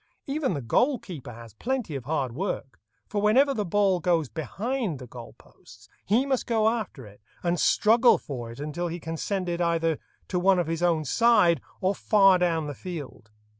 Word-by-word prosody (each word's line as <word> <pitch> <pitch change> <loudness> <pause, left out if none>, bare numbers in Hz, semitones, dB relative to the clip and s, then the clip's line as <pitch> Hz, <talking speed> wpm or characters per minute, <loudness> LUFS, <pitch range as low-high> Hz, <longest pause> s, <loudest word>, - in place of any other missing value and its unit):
Even 275 - -1
the 140 - -4
goal 250 - +2
keeper 150 - -9
has 115 -2 -12
plenty 240 - -3
of 130 -3 -6
hard 135 -4 -1
work, 135 - -4 0.3
for 205 - -3
whenever 260 +7 +4
the 215 -5 -1
ball 195 0 +2
goes 165 -5 +1
behind 195 - -3
the 130 - -9
goal 120 -1 -11
posts - - -18 0.2
he 230 +7 +2
must 265 -2 -1
go 220 -2 +2
after 215 - -2
it, 105 0 -16 0.2
and 175 0 0
struggle 230 +3 +4
for 120 -5 -7
it 115 - -11
until 155 +4 -3
he 170 +1 -5
can 165 0 -5
send 190 +2 -2
it 175 0 -2
either 165 -2 +1 0.3
to 180 - -1
one 190 +1 +4
of 175 - +1
his 165 +1 -3
own 165 -3 +2
side 205 - +4 0.2
or 190 +1 +2
far 195 -2 +4
down 165 -3 +1
the 145 - -5
field. 150 -10 -8
175 Hz, 195 wpm, -26 LUFS, 150-210 Hz, 0.3 s, whenever